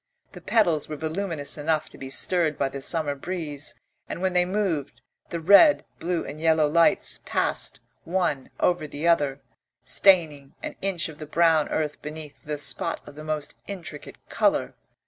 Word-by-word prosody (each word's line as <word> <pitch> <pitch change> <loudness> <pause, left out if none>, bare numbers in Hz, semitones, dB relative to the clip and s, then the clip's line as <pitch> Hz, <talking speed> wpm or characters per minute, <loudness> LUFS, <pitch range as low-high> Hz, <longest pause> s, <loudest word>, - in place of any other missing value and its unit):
The - - -11
petals 170 -11 +2
were 155 - -4
voluminous 160 -2 -2
enough 155 +1 0
to - - -14
be 135 - -7
stirred 160 +2 +1
by 140 - 0
the 140 0 -7
summer 155 0 +1
breeze, 150 -1 -5 0.3
and - - -4
when 185 0 0
they 180 0 +4
moved, 180 - -2 0.3
the 170 - -3
red, 200 - +6
blue 170 0 -1
and 150 +2 -8
yellow 160 -2 +4
lights 170 +6 +3
passed - - 0 0.2
one 170 -6 -1
over 175 -4 +1
the 150 +3 -3
other, 145 -5 +2 0.4
staining 150 -2 +3
an - - -5
inch 190 -4 0
of 155 -2 -11
the 155 - -7
brown 160 -1 +3
earth 150 -2 -2
beneath 150 -1 -8
with - - -18
a 150 - -1
spot 145 - -2
of 145 - -10
the 155 +2 -10
most 155 -2 -4
intricate 175 -6 -7
colour. - - +1
155 Hz, 170 wpm, -25 LUFS, 145-175 Hz, 0.4 s, red